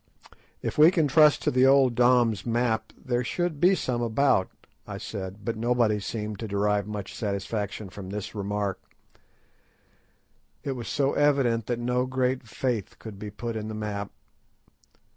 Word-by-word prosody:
"If - - -3
we 155 +2 +9
can 165 -4 +2
trust 150 +1 +5
to - - +2
the 130 +1 +4
old 135 -2 +5
Dom's 120 -4 +3
map 115 -2 0
there 125 -1 -1
should 175 +3 -2
be 185 +4 +5
some 125 -8 -2
about," 115 -4 +2 0.4
I - - -6
said; 95 +2 -7
but 115 -1 -1
nobody 115 -2 +1
seemed 105 -1 -5
to 110 - -4
derive 100 0 0
much 105 -2 -6
satisfaction 100 0 -3
from 95 0 -9
this 105 0 -5
remark. 100 -1 -2 1.8
It 140 - -2
was 125 -3 -5
so 140 0 +1
evident 135 -6 +2
that 120 - -1
no 125 +1 0
great 130 -1 -1
faith 115 -3 -3
could 105 -3 -10
be 105 0 -6
put 115 +3 -5
in 110 -1 -4
the 110 - -5
map. 105 -1 -4
115 Hz, 160 wpm, -26 LUFS, 105-130 Hz, 1.8 s, we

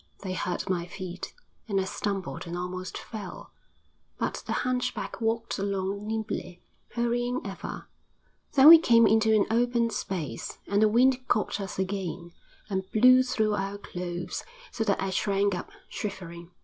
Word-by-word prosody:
They 185 -2 -3
hurt 180 0 -2
my 175 -2 -1
feet, 185 -1 -7 0.4
and 200 -3 +1
I - - +1
stumbled 190 -6 -3
and 170 +1 -4
almost 185 +1 -5
fell, 215 -3 -8 0.6
but - - -2
the - - -2
hunchback 250 -1 -2
walked 225 -1 -1
along 200 +1 -2
nimbly, 215 -5 -4 0.3
hurrying 240 +1 0
ever. 195 -1 -6 0.7
Then 280 +1 +9
we 330 0 +12
came 230 -7 +5
into 220 0 +4
an 205 - +4
open 235 0 +2
space, 160 - -4
and 200 +1 +1
the 215 - +6
wind 255 +3 +3
caught 210 -1 0
us 195 - -6
again, 190 -3 -3 0.4
and 190 -2 -3
blew 255 +3 +7
through 220 -4 +1
our 195 0 -2
clothes, 175 -2 -5 0.3
so 225 - -1
that 200 -2 +1
I 195 0 -1
shrank 200 +1 +1
up, 175 - -5 0.2
shivering. 170 -4 -6
200 Hz, 150 wpm, -28 LUFS, 185-230 Hz, 0.7 s, we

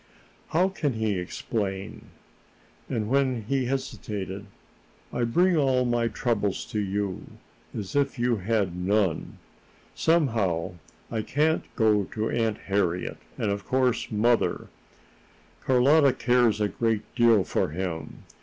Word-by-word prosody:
"How 175 +4 +2
can 150 -8 -1
he 110 -4 -1
explain?" 95 +1 -4 0.8
And, 110 -2 -1
when 130 -2 +1
he 130 +3 0
hesitated: 105 -7 -4 0.7
"I 120 - 0
bring 175 +10 +3
all 130 -4 +2
my 120 -1 +1
troubles 105 -3 -1
to 105 - -1
you, 100 -1 -2 0.5
as 100 +1 -5
if 140 -1 +1
you 120 -1 +1
had 100 -2 0
none. 95 -1 0 0.6
Somehow, 110 - +1 0.4
I 110 - -1
can't 150 +8 +1
go 105 -3 +3
to 110 +3 -3
Aunt 115 -2 0
Harriet, 90 -3 0 0.2
and 105 - 0
of 100 0 -3
course 130 -2 +1
mother 115 +2 +1 0.9
Carlotta 135 +2 +5
cares 120 -4 +2
a 105 - +2
great 110 +1 0
deal 115 -4 +5
for - - 0
him. 85 0 -5
110 Hz, 125 wpm, -26 LUFS, 100-130 Hz, 0.9 s, Carlotta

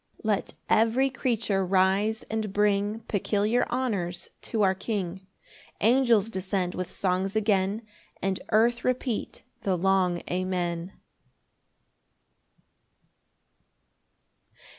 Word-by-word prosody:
8 - - -17
Let 210 -2 0
every 230 +5 +3
creature 225 -7 0
rise, 195 +4 +2
and 220 -2 -3
bring 205 +1 +1
Peculiar 210 +3 0
honours 195 -9 -2 0.2
to 220 -3 +1
our 190 -1 +4
King; 190 -2 -4 0.5
Angels 230 -2 +4
descend 185 -2 -1
with 185 -1 -4
songs 190 +1 -1
again, 205 0 +1 0.4
And 190 -1 -1
earth 235 +2 +3
repeat 250 -2 -2 0.2
the 190 -2 0
long 185 -1 +2
Amen. 180 -1 -2
200 Hz, 95 wpm, -27 LUFS, 185-220 Hz, 0.5 s, our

